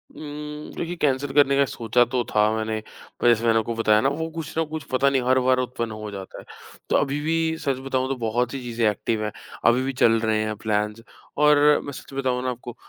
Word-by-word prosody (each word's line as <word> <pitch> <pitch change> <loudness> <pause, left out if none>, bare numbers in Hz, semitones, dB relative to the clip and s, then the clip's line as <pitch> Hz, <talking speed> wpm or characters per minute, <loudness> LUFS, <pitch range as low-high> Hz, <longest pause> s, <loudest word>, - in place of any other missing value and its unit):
उम, 150 0 -7
देखिए 175 +1 -4
कैन्सल 140 -3 0
करने 140 -1 +5
का 140 - +5
सोचा 115 0 +1
तो 125 -2 +1
था 105 0 +5
मैंने, 110 0 -2 0.4
पर - - +2
जैसे 120 -1 +4
मैंने 115 -1 +4
आपको 115 +1 -3
बताया 110 -2 +3
ना 135 - +3
वो 160 +3 -3
कुछ 160 -1 -6
ना 165 - +3
कुछ 155 0 -6
पता 135 +2 +3
नहीं 135 -1 +1
हर 130 0 +5
बार 130 0 +4
उत्पन्न 120 -2 -3
हो 110 -1 -7
जाता 95 -1 -8
है। - - -13 0.4
तो - - +2
अभी 140 0 0
भी 160 +1 0
सच 140 -4 -1
बताऊँ 130 -1 0
तो 135 - 0
बहुत 120 +1 -1
सी 135 - -4
चीजें 115 -2 +1
एक्टिव 110 +1 -2
हैं, 105 - -2 0.3
अभी 120 +2 +5
भी 135 +1 -2
चल 115 -2 +4
रहे 110 -1 +1
हैं 110 0 -3
प्लान्स 105 0 -1 0.4
और 150 0 +5 0.3
मैं 145 - -5
सच 135 - -11
बताऊँ 130 -2 -1
ना 130 - -1
आपको 120 -1 -7
125 Hz, 235 wpm, -24 LUFS, 110-140 Hz, 0.4 s, करने